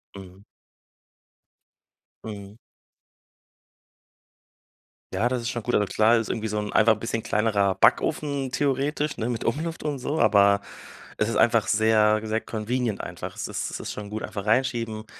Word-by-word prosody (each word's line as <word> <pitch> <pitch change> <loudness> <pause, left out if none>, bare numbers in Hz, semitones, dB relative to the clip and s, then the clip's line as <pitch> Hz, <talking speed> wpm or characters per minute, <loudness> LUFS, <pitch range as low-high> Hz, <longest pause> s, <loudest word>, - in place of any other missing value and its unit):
Mhm. 95 0 -12 1.8
Mhm. 100 -1 -8 2.6
Ja, 100 +6 +1
das 125 0 -1
ist 115 - -3
schon 120 -2 -4
gut. 120 - -2
Also 105 -1 +2
klar 110 +4 +4
ist 115 - -2
irgendwie 110 -1 -2
so 105 0 -2
'n 105 0 -4
einfach 110 0 +5
bisschen 115 +1 -4
kleinerer 105 -3 +1
Backofen 140 +5 +1
theoretisch, 145 +2 -1
ne, 110 - -2
mit 120 -2 -3
Umluft 160 +7 -2
und 150 -2 -2
so, 145 +4 -3
aber 100 -1 +5 0.6
es 105 - +1
ist 115 - -2
einfach 115 -3 +3
sehr, 110 0 +4
wie - - -5
gesagt, 110 +1 -2
convenient 115 0 -2
einfach. - - -7
Es - - -4
ist - - -4
es - - -5
ist - - -5
schon 105 -1 -7
gut, 110 +1 -4
einfach 100 -2 -6
reinschieben, 115 -2 0
110 Hz, 160 wpm, -25 LUFS, 105-125 Hz, 2.6 s, einfach